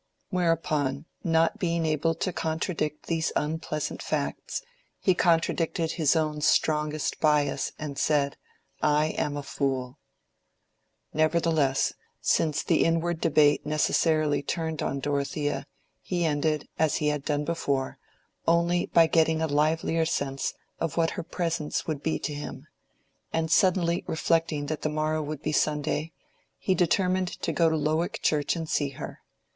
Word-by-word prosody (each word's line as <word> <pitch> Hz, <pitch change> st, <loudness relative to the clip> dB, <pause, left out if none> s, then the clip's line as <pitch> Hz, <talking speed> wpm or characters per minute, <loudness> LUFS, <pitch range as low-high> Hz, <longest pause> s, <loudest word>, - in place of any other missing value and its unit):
Whereupon, 155 Hz, -5 st, 0 dB, 0.2 s
not 165 Hz, -1 st, +2 dB
being 170 Hz, -2 st, 0 dB
able 155 Hz, +1 st, +1 dB
to 180 Hz, +2 st, -2 dB
contradict 160 Hz, -2 st, -2 dB
these 165 Hz, -1 st, 0 dB
unpleasant 155 Hz, 0 st, -2 dB
facts, -, -, -3 dB, 0.4 s
he 185 Hz, -, +3 dB
contradicted 165 Hz, -1 st, +1 dB
his 155 Hz, -2 st, +2 dB
own 155 Hz, -2 st, 0 dB
strongest 150 Hz, 0 st, +1 dB
bias 150 Hz, -3 st, +2 dB
and 145 Hz, -2 st, -5 dB
said, 140 Hz, -2 st, +2 dB, 0.5 s
"I 150 Hz, +1 st, +3 dB
am 145 Hz, -2 st, -2 dB
a 145 Hz, -, -4 dB
fool." 130 Hz, -3 st, -2 dB, 1.1 s
Nevertheless, 155 Hz, -3 st, +2 dB, 0.3 s
since 155 Hz, -1 st, +1 dB
the 165 Hz, -, +3 dB
inward 165 Hz, 0 st, 0 dB
debate 150 Hz, -2 st, +4 dB
necessarily 155 Hz, 0 st, +2 dB
turned 160 Hz, +1 st, -3 dB
on 140 Hz, -, -2 dB
Dorothea, 145 Hz, +1 st, -1 dB, 0.3 s
he 175 Hz, -2 st, -1 dB
ended, 150 Hz, 0 st, 0 dB
as 160 Hz, -1 st, +3 dB
he 150 Hz, -, +1 dB
had 150 Hz, -2 st, -2 dB
done 150 Hz, 0 st, -1 dB
before, 140 Hz, -5 st, -1 dB, 0.5 s
only 170 Hz, +1 st, +3 dB
by 165 Hz, -, +5 dB
getting 160 Hz, 0 st, +3 dB
a 160 Hz, -, +1 dB
livelier 160 Hz, +2 st, +1 dB
sense 135 Hz, -3 st, -2 dB, 0.2 s
of 165 Hz, -2 st, -2 dB
what 165 Hz, -1 st, +2 dB
her -, -, -4 dB
presence 165 Hz, -3 st, -2 dB
would 155 Hz, -3 st, -3 dB
be 160 Hz, -, 0 dB
to 150 Hz, -, -4 dB
him; 145 Hz, 0 st, -7 dB, 0.7 s
and 160 Hz, -1 st, -1 dB
suddenly 175 Hz, -1 st, +3 dB
reflecting 160 Hz, -2 st, +1 dB
that 155 Hz, +1 st, -3 dB
the 155 Hz, -, 0 dB
morrow 155 Hz, +1 st, 0 dB
would 150 Hz, 0 st, -5 dB
be 155 Hz, -, 0 dB
Sunday, 150 Hz, +1 st, 0 dB, 0.5 s
he 190 Hz, -, +1 dB
determined 185 Hz, +1 st, +2 dB, 0.2 s
to -, -, +1 dB
go 165 Hz, -1 st, +4 dB
to 160 Hz, -, +1 dB
Lowick 155 Hz, +3 st, 0 dB
Church 150 Hz, 0 st, +2 dB
and 165 Hz, -1 st, -4 dB
see 145 Hz, -2 st, 0 dB
her. -, -, -7 dB
155 Hz, 140 wpm, -27 LUFS, 150-165 Hz, 1.1 s, by